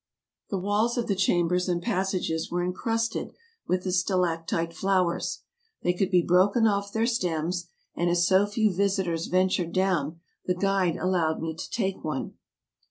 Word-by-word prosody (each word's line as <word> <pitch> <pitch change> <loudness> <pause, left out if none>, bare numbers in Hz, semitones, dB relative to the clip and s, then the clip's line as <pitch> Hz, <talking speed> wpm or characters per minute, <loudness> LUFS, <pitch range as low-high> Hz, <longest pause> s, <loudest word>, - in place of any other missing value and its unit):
The 195 - -1
walls 205 +6 0
of 240 - 0
the 200 - +1
chambers 180 -1 +1
and 175 -1 +1
passages 185 -5 -1
were 175 0 -1
incrusted 225 +5 -2 0.3
with 180 0 0
the 185 - -2
stalactite 170 -3 0
flowers. 185 -1 0 0.4
They 180 - +2
could 185 +1 0
be 180 -2 +4
broken 195 +7 +4
off 200 -1 +1
their 225 +2 +1
stems, 175 -6 -1 0.3
and 175 0 0
as 175 0 +3
so 190 +2 +4
few 210 -1 +1
visitors 190 -3 0
ventured 185 -2 +1
down, 175 -5 0 0.3
the 180 - +1
guide 195 -2 +1
allowed 175 -4 0
me 160 0 -3
to 160 - -7
take 195 -4 -2
one. 155 -4 -3
185 Hz, 160 wpm, -27 LUFS, 175-195 Hz, 0.4 s, be